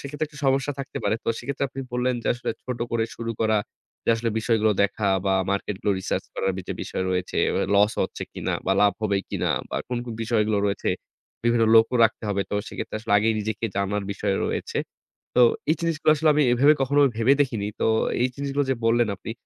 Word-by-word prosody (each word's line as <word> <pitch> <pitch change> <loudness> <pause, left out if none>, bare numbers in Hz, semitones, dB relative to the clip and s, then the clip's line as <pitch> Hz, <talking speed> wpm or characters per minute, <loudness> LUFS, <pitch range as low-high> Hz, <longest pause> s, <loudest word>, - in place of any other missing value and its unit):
সেক্ষেত্রে 145 +2 -4
একটু 150 - -14
সমস্যা 135 +1 +2
থাকতে 135 -1 -5
পারে। - - +2
তো - - -3
সেক্ষেত্রে 140 +3 -3
আপনি 135 +1 -7
বললেন 125 +1 +1
যে - - -6
আসলে 120 - -3
ছোট 125 -2 -4
করে 115 -1 +1
শুরু 115 0 -4
করা, 110 -1 +3 0.5
যে - - -6
আসলে 115 0 -1
বিষয়গুলো 110 -1 +2
দেখা 100 0 0 0.2
বা 95 - +3 0.2
market 100 0 -2
গুলো 105 - +1
research - - -2
করার 95 - 0 0.2
যে - - -1
বিষয় - - -3
রয়েছে, 90 0 -2 0.4
loss 105 +2 +4
হচ্ছে - - -4
কিনা - - -3
বা 95 - +3
লাভ 100 0 +5
হবে 100 -2 +1
কিনা - - -1 0.2
বা - - -3
কোন, 125 - -2
কোন 120 -2 -6
বিষয়গুলো 110 -2 +1
রয়েছে, 100 0 -1 0.6
বিভিন্ন 120 -1 +3
লোকও 115 +2 +5
রাখতে 115 - 0
হবে। 100 -1 0
তো - - -2
সেক্ষেত্রে - - -5
আসলে 110 -1 -3
আগেই 110 +2 +2
নিজেকে 110 +1 -3
জানার 100 +1 -1
বিষয় 100 0 -1
রয়েছে। - - -2 0.6
তো 125 - +6 0.3
এই 155 - +4
জিনিসগুলো 165 -2 +2
আসলে 155 +1 +2
আমি 150 0 +3
এভাবে 140 +5 +5
কখনো 140 +2 +2 0.2
ভেবে 115 +4 +4
দেখিনি। 115 -7 -1
তো - - +2 0.4
এই 125 - +4
জিনিসগুলো 140 0 -1
যে 135 - +2
বললেন 115 0 +3
আপনি 105 - -7
115 Hz, 205 wpm, -24 LUFS, 105-135 Hz, 0.6 s, তো